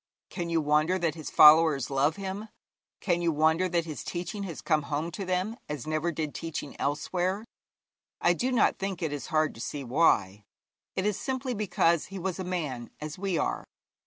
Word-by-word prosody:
Can 175 -3 -4
you 165 -1 +2
wonder 155 +4 +2
that 170 -4 0
his 155 -2 -7
followers 150 -3 +6
love 140 +3 +2
him? 195 +2 -5 0.5
Can 175 -3 +1
you 170 -1 +2
wonder 160 +4 +2
that 170 -1 0
his 155 -3 -6
teaching 180 +4 -4
has 170 -4 -6
come 155 -2 +1
home 155 +3 -2
to 195 +3 -5
them 185 +5 -1
as 150 -5 -4
never 155 +2 -1
did 155 -2 -3
teaching 165 -3 -5
elsewhere? 180 +8 -1 0.7
I 175 - +4
do 250 +9 -1
not 250 - +3
think 195 -3 -3
it 155 -2 -1
is 145 - -5
hard 155 -1 +1
to 115 - -10
see 140 +2 -4
why: 110 - +2 0.5
it 190 - -1
is 210 -2 0
simply 260 -1 -2
because 175 -6 +1
he 195 - -8
was 190 0 -3
a - - -2
man 150 -10 -3
as 150 +2 -6
we 195 -3 -1
are. - - -1
165 Hz, 190 wpm, -28 LUFS, 150-185 Hz, 0.7 s, followers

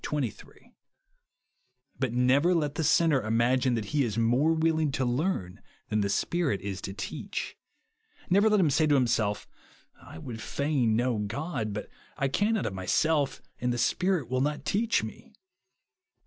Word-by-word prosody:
But 130 -3 0
never 130 +8 +3
let 150 -4 0
the 160 - -2
sinner 155 -2 +3
imagine 120 +3 +2
that 110 -2 -2
he 145 -2 +3
is 110 -3 -2
more 120 +7 +3
willing 160 -2 +1
to 130 -2 0
learn 120 - -2 0.3
than 105 -1 +1
the 100 - 0
Spirit 160 - 0
is 95 -1 -5
to 95 - -5
teach. 100 - -5 0.7
Never 200 +4 +4
let 210 -1 +3
him 165 -6 +3
say 155 +3 +3
to 145 - +4
himself, 115 -5 +1 0.3
" - - -36
I - - -12
would 110 +6 -7
fain 130 -1 0
know 120 -1 +1
God, 115 +2 -3
but 105 +1 -5 0.3
I 135 - 0
cannot 210 +8 +1
of - - -2
myself, 140 +10 0 0.2
and 125 0 0
the 120 - -2
Spirit 180 +3 +1
will 130 +1 -1
not 150 +2 -2
teach 225 +3 +1
me." - - -9
130 Hz, 160 wpm, -28 LUFS, 115-160 Hz, 0.7 s, Never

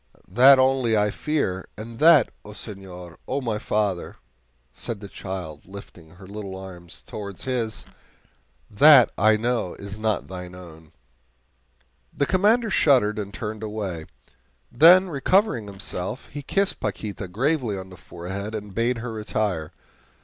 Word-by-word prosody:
That 130 +6 +8
only 130 -4 +3
I 105 0 +2
fear 100 -13 -2
and 115 +2 -9
that, 155 -5 +6
O 105 - -11
senor, 95 -5 -10
O 135 - -1
my 115 -5 -2
father," 105 -4 -1 0.6
said 115 -3 -7
the 100 - -9
child, 90 -7 -7
lifting 90 -4 -12
her 95 +1 -13
little 100 -1 -7
arms 90 -3 -11
towards 100 -3 -7
his 120 -4 -3 0.8
"that 135 +3 +7
I 110 +1 +4
know 115 -5 -1
is 100 +1 -9
not 110 -1 -1
thine 90 -1 -8
own!" 80 -4 -13 1.2
The 140 - 0
Commander 210 - +2
shuddered 120 - +3
and 100 -1 -5
turned 110 0 -6
away. 100 -7 -5 0.6
Then, 175 +8 +7
recovering 165 - +1
himself, 95 +2 -6
he 145 - -7
kissed 195 +8 0
Paquita 100 -3 -4
gravely 120 - 0
on 95 0 -9
the - - -11
forehead 95 +6 -7
and 105 -2 -7
bade 115 +3 0
her 120 - -4
retire. 105 -7 -2
105 Hz, 140 wpm, -24 LUFS, 95-125 Hz, 1.2 s, That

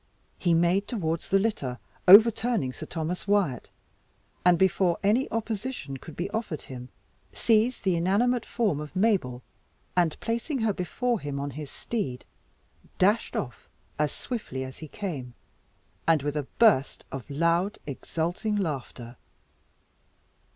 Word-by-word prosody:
He 170 -2 +3
made 175 +4 +2
towards 165 -9 -2
the 195 - +5
litter, 195 - -1 0.3
over 215 +5 +10
turning 220 - -1
Sir - - -8
Thomas 170 +3 -4
Wyat, 200 - +1 0.7
and 180 -1 +5
before 185 -1 +3
any 220 +7 +3
opposition 220 - -3
could 160 +3 -11
be 175 - -2
offered 215 -9 -3
him, 125 -1 -9 0.4
seized 230 +2 +2
the 190 -3 +2
inanimate 210 +8 +2
form 210 -11 0
of 150 +3 -8
Mabel, 185 - +1 0.5
and 175 -3 +2
placing 235 +6 -2
her 220 -2 +2
before 230 +6 -1
him 145 -3 -4
on 140 0 -3
his 145 +1 -7
steed, 135 - -4 0.7
dashed 205 +5 +2
off 125 -3 -5 0.3
as 150 -1 +2
swiftly 210 - -5
as 130 0 -8
he 155 - -7
came, 140 - -5 0.7
and 160 -4 +4
with 145 0 -2
a 145 -3 -2
burst 210 - +4
of 135 +1 -7
loud, 170 +7 +1
exulting 170 - -2
laughter. 130 - -4
175 Hz, 135 wpm, -27 LUFS, 145-215 Hz, 0.7 s, over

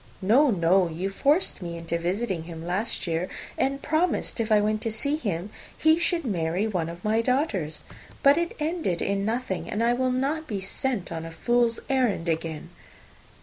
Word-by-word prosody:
"No, 260 +9 +5
no. 180 -2 +3
You 180 +5 -3
forced 290 - +2
me 170 -1 -5
into 170 0 -2
visiting 185 -1 -1
him 165 -1 -8
last 190 +6 -2
year, 170 +1 -1 0.3
and 275 +1 -1
promised, 315 -3 0
if 225 -1 -1
I 215 - +6
went 215 +1 0
to 225 - -1
see 280 +7 -1
him, 200 - -3 0.3
he 315 +1 +4
should 345 -2 +1
marry 175 -2 0
one 180 -7 -1
of 170 +1 -9
my 220 +2 +3
daughters. 230 - -1 0.4
But 280 +1 +7
it 340 +1 -1
ended 305 - -1
in 200 0 0
nothing, 225 -3 -2
and 215 +2 -1
I 235 +1 +4
will 255 +1 +1
not 280 +5 -1
be 205 -4 -2
sent 200 +2 -2
on 165 -1 -4
a 165 - -6
fool's 235 +7 +1
errand 245 -10 +1
again." 160 -1 -3
215 Hz, 185 wpm, -26 LUFS, 175-265 Hz, 0.4 s, But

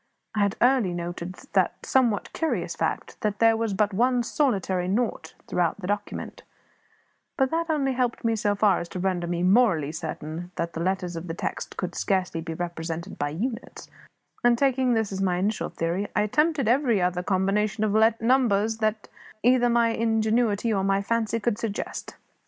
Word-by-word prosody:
I 215 - -2
had 200 -1 +2
early 245 -8 +3
noted 175 +1 -5
the - - +1
somewhat 240 -6 +1
curious 200 - -1
fact 160 - -3
that 210 -1 -1
there 225 0 +5
was 225 -3 -1
but 205 +1 +1
one 245 +4 +2
solitary 195 - 0
nought 200 -5 -2
throughout 175 +2 0
the 185 - -6
document; 205 +1 -4 1.0
but 265 -1 +2
that 330 +1 -1
only 280 -4 +1
helped 250 -2 -1
me 225 0 +2
so 205 -1 0
far 205 -1 +3
as 170 - -6
to 185 - -5
render 180 -2 -1
me 175 0 -1
morally 185 - +3
certain 160 +2 -6
that 170 0 -3
the - - -5
letters 180 0 -1
of 165 +2 -6
the 165 - -4
text - - -5
could - - -3
scarcely 185 -4 -1
be 165 0 -5
represented 170 +1 -5
by 145 - 0
units; 225 - -5 0.5
and, 240 0 +5
taking 260 -1 +2
this 220 -2 0
as 195 0 -3
my 180 -2 +1
initial 200 +4 -1
theory, 175 +5 -2
I 210 - +3
attempted 300 +4 +1
every 240 -3 +3
other 180 0 0
combination 195 +3 0
of 220 +2 +3
numbers 225 -3 +2
that 215 -1 -1 0.4
either 245 0 +4
my 235 -1 +3
ingenuity 225 -1 +1
or 195 -2 0
my 195 0 +1
fancy 230 +1 0
could 225 0 -1
suggest. 220 -3 -4
205 Hz, 175 wpm, -26 LUFS, 180-235 Hz, 1.0 s, there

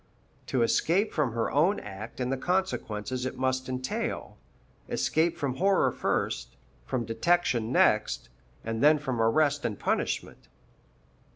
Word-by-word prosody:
To 125 -3 +1
escape 175 - +2
from 140 -7 0
her 115 -1 -1
own 170 +8 +3
act 105 +4 -9
and 125 0 -1
the - - +1
consequences 130 - -2
it - - -6
must 130 0 -1
entail 130 0 -3 0.5
escape 160 +2 +1
from 135 -3 -2
horror 195 +1 +3
first, - - -2 0.3
from 120 -2 -1
detection 120 -2 +1
next, 105 -4 +2 0.4
and 115 0 -2
then 150 +1 +6
from 130 -5 -2
arrest 145 +5 +2
and 105 -4 -2
punishment. - - -2
130 Hz, 130 wpm, -28 LUFS, 115-155 Hz, 0.5 s, then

